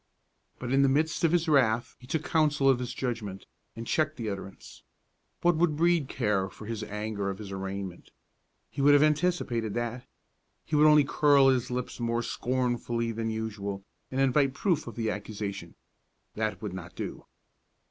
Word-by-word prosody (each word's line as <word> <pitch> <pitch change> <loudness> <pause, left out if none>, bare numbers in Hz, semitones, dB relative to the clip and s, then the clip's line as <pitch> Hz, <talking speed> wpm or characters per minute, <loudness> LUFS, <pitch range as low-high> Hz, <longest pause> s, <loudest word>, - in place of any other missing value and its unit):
But 125 +1 -3
in 135 - +5
the 135 - +5
midst 155 +5 +1
of 165 - +4
his 170 -1 +2
wrath 120 -6 +2
he 125 - -14
took 155 +3 -1
counsel 150 -3 +2
of 135 -2 +5
his 125 -1 -4
judgment, 110 -7 -4 0.3
and 115 +1 -6
checked 155 +4 0
the 110 -4 -3
utterance. 95 0 -9 0.6
What 175 -2 +4
would 160 -2 +2
Brede 170 -3 +2
care 105 -5 0
for 105 - -12
his 110 0 -4
anger 105 -1 -3
or 95 - -3
his 100 0 -9
arraignment? 95 -1 -5 0.6
He - - -3
would 145 +1 +7
have 145 - +6
anticipated 150 - +1
that. 120 +1 -3 0.6
He 155 - -2
would 150 +1 +6
only 150 -1 +7
curl 140 -1 +5
his 130 -2 +1
lips 125 0 -4
more 115 0 0
scornfully 120 -2 -1
than 115 0 -3
usual, 100 -3 -4 0.3
and 130 - -3
invite 135 0 +3
proof 165 -4 0
of 120 - -7
the 110 -2 -1
accusation. 100 -4 -5 0.6
That 110 0 -3
would 100 -4 -4
not 90 -1 -8
do. - - -6
120 Hz, 175 wpm, -28 LUFS, 105-145 Hz, 0.6 s, would